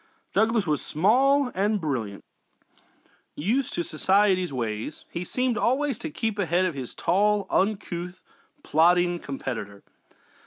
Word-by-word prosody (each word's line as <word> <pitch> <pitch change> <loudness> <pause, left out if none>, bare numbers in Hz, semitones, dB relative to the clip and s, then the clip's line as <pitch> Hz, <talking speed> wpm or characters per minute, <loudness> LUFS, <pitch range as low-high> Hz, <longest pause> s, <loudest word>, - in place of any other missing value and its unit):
Douglas 220 +1 +2
was 150 -3 0
small 255 - +3
and 205 +2 +1
brilliant; 120 - -4 1.1
used 235 - -1
to 175 - -1
society 190 +2 +2
ways, 115 +1 -4
he 170 - -4
seemed 250 +4 -1
always 265 -1 +1
to 320 - -5
keep 225 -7 -3
ahead 180 0 +2
of 180 - -1
his 130 -4 -7
tall, 205 +2 +2
uncouth, 180 -3 -1 0.4
plodding 175 +2 +3
competitor. 115 -9 -6
185 Hz, 120 wpm, -25 LUFS, 155-215 Hz, 1.1 s, small